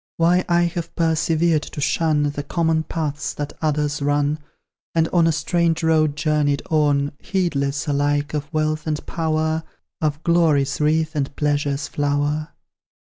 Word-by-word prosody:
Why 175 +2 +3
I 175 0 +4
have 170 -1 -3
persevered 160 -1 +2
to 150 - -8
shun 150 +1 +1
The 145 - -4
common 160 +1 0
paths 155 -2 -3
that 145 -1 -4
others 150 -2 0
run; 145 +1 +1 0.6
And 165 -1 +3
on 170 -2 +3
a - - +4
strange 170 +1 0
road 155 -2 +3
journeyed 150 -2 +1
on, 145 -2 +2
Heedless, 145 -7 -1
alike 145 0 0
of 150 0 -3
wealth 155 0 -1
and 150 -1 -2
power 160 -1 -1 0.4
Of 155 0 -1
glory's 150 -5 +2
wreath 155 +1 +1
and 140 -1 -2
pleasure's 145 -1 0
flower. 145 +1 -1
155 Hz, 145 wpm, -21 LUFS, 145-160 Hz, 0.6 s, I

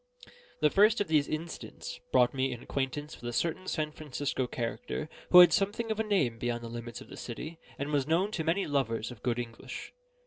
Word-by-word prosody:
The 150 -1 +5
first 215 +3 +5
of 205 -5 -1
these 150 -3 +3
incidents 160 +2 -5
brought 125 -1 +5
me 135 0 0
in 120 -1 -6
acquaintance 140 +3 -3
with 120 - -4
a - - -5
certain 170 +7 -1
San 155 -3 -1
Francisco 145 -3 -2
character, 125 - -3 0.2
who 180 - +11
had 175 - +8
something 215 +3 +1
of 220 - -2
a - - +3
name 160 - +1
beyond 120 0 -2
the 115 - -6
limits 120 0 -6
of - - -11
the - - -10
city, 155 +7 -6 0.2
and 140 +2 -3
was 145 -2 +1
known 180 +6 +2
to 170 -6 -2
many 170 +5 +1
lovers 125 -5 0
of 120 - -11
good 120 -1 0
English. 115 -2 -6
145 Hz, 210 wpm, -30 LUFS, 120-170 Hz, 0.2 s, who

